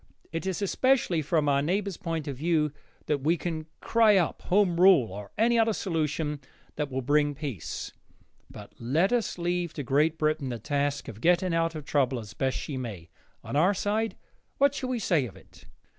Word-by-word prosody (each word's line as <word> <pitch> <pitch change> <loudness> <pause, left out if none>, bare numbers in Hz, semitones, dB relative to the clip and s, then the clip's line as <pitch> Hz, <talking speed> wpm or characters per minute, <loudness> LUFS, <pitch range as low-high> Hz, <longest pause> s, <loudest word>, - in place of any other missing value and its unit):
It 165 +3 -3
is 190 +2 -2
especially 235 -5 +2
from 150 0 +1
our 140 -1 +3
neighbor's 190 +5 -1
point 165 -3 -4
of 140 - -3
view 155 +1 +1 0.3
that 145 -2 0
we 165 +5 +2
can 160 -2 -4
cry 225 -3 +4
up 175 -4 0
Home 180 -3 +2
Rule 175 - +6
or 100 0 -8
any 235 +1 +3
other 225 -1 +3
solution 155 -5 -2 0.4
that 150 -2 -2
will 130 0 -3
bring 145 +2 +2
peace. 135 - -5 0.6
But 105 -1 -11
let 155 - +1
us 235 -6 0
leave 175 -1 -1
to 145 - -4
Great 150 +5 +2
Britain 155 -3 0
the 120 - -3
task 145 +4 -1
of 110 0 -9
getting 180 +2 +3
out 165 0 +1
of 155 -2 -6
trouble 135 -3 +1
as 105 -3 -9
best 130 -1 -1
she 140 - -5
may. 100 -10 -6 0.3
On - - -5
our 180 +7 +4
side, 215 +3 -1 0.4
what 280 0 +4
shall 260 -2 -4
we 255 - 0
say 170 - +1
of 95 - -13
it? - - -18
155 Hz, 190 wpm, -28 LUFS, 140-185 Hz, 0.6 s, Rule